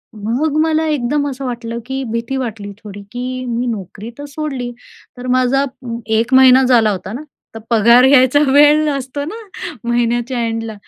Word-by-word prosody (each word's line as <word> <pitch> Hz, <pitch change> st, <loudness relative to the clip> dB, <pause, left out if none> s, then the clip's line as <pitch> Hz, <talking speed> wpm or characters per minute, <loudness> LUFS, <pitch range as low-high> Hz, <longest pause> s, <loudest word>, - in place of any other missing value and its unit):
मग 245 Hz, +9 st, -2 dB
मला 320 Hz, 0 st, +1 dB
एकदम 285 Hz, 0 st, 0 dB
असं 270 Hz, 0 st, -6 dB
वाटलं 235 Hz, -1 st, -5 dB
की 265 Hz, +1 st, -4 dB
भीती 230 Hz, +3 st, -3 dB
वाटली 220 Hz, -5 st, -5 dB
थोडी, 205 Hz, -1 st, -9 dB
की 255 Hz, +1 st, -5 dB
मी 240 Hz, 0 st, -2 dB
नोकरी 210 Hz, 0 st, -6 dB
तर 290 Hz, -, -7 dB
सोडली. 280 Hz, -4 st, -5 dB, 0.5 s
तर 250 Hz, -, -7 dB
माझा 255 Hz, +2 st, +2 dB, 0.5 s
1 235 Hz, +3 st, 0 dB
महिना 260 Hz, 0 st, +7 dB
झाला 240 Hz, -4 st, +4 dB
होता 190 Hz, +1 st, -5 dB
ना. 275 Hz, +6 st, -6 dB, 0.3 s
तर 225 Hz, -, -7 dB
पगार 235 Hz, +2 st, +5 dB
घ्यायचा 265 Hz, 0 st, +5 dB
वेळ 295 Hz, +2 st, +5 dB
असतो 275 Hz, +1 st, -4 dB
ना 370 Hz, +9 st, -6 dB, 0.5 s
महिन्याच्या 240 Hz, +1 st, 0 dB
एंडला. 225 Hz, -1 st, -4 dB
250 Hz, 160 wpm, -17 LUFS, 230-275 Hz, 0.5 s, महिना